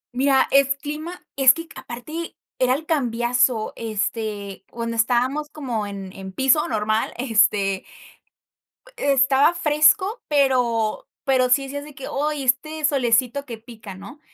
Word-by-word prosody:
Mira, 270 +1 +3
es 275 0 +4
clima 305 +5 -7
es 265 -1 +6
que 330 0 -7
aparte, 305 +8 -7 0.2
era 255 0 +3
el 315 +3 -6
cambiazo. 240 -5 +1
Este, 210 -3 -4
cuando 230 0 -4
estábamos 250 +6 +1
como 245 -9 -4
en 195 -2 -8
en 190 -1 -8
piso 265 +7 +2
normal, 215 -1 0
este 215 -6 +2 1.2
e-estaba 275 +3 +3
fresco, 315 +9 +3
pero 250 -7 +1 0.2
pero 260 -2 +3
sí 275 +2 +3
decías 285 +1 -6
de 295 -2 -13
que: 270 - -8
"Oy, 295 0 -2
este 295 +5 0
solecito 260 -1 +1
que 230 -3 -7
pica", 220 -4 -11
¿no? 200 +10 -11
255 Hz, 135 wpm, -22 LUFS, 225-285 Hz, 1.2 s, es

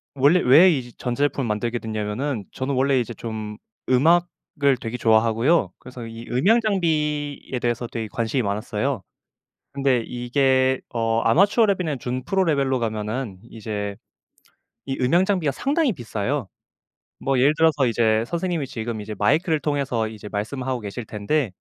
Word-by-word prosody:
원래 145 +7 +4
왜 160 +8 +7
이 125 -5 -3
전자 125 +2 -2
제품을 140 -3 0
만들게 115 +3 -1
됐냐하면은 110 +3 -3
저는 135 +2 -3
원래 135 0 +3
이제 120 0 -3
좀 110 -2 -6 0.3
음악을 145 -1 +2
되게 115 +1 -4
좋아하고요. 115 - +3
그래서 125 -2 -10
이 115 +1 -9
음향 195 - +3
장비에 150 - -1
대해서 120 0 -1
되게 115 -1 -5
관심이 115 +3 -1
많았어요. 105 +1 -2 0.7
근데 135 -4 +1
이게 130 +2 +1
어 115 -1 0
아마추어 205 - +4
레벨이랑 180 -8 -1
준프로 130 +11 -1
레벨로 140 -5 +1
가면은 110 -1 -3
이제 105 -2 -5 0.9
이 135 -1 -3
음향 170 +9 +3
장비가 180 -8 +1
상당히 285 - 0
비싸요. 120 - -3 0.7
뭐 135 -1 0
예를 140 +4 +5
들어서 155 -4 +3
이제 110 -1 +2
선생님이 170 0 -2
지금 115 -2 -4
이제 105 +1 -6
마이크를 155 - +2
통해서 135 -6 -1
이제 110 -1 -9
말씀하고 125 +5 -3
계실 110 +2 -6
텐데 110 +4 -1
125 Hz, 345 characters per minute, -23 LUFS, 115-150 Hz, 0.9 s, 왜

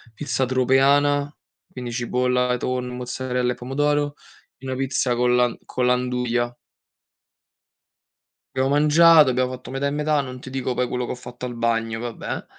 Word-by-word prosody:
Pizza 135 0 -1
tropeana, 140 +3 +3 0.4
quindi, 125 -2 -6
cipolla, 125 +1 0
tonno, 125 0 -3
mozzarella 125 0 -2
e - - -13
pomodoro, 145 +3 -1 0.4
e - - -13
una 130 - -3
pizza 130 -1 0
con 125 0 +2
la 125 -1 +2
con 125 - -2
la 125 0 +4
nduja. 125 -1 -1 2.0
Abbiamo 130 0 +1
mangiato, 150 +1 +6
abbiamo 125 0 0
fatto 130 0 -9
metà 135 +1 -1
e - - 0
metà, 150 0 +1
non 130 -2 -8
ti 130 - -10
dico 130 -1 -2
poi 125 0 0
quello 125 0 -2
che - - -5
ho - - -3
fatto 125 0 -9
al 120 -1 -5
bagno, 115 -1 -1
vabbè, 120 -1 -5
125 Hz, 160 wpm, -23 LUFS, 125-135 Hz, 2.0 s, mangiato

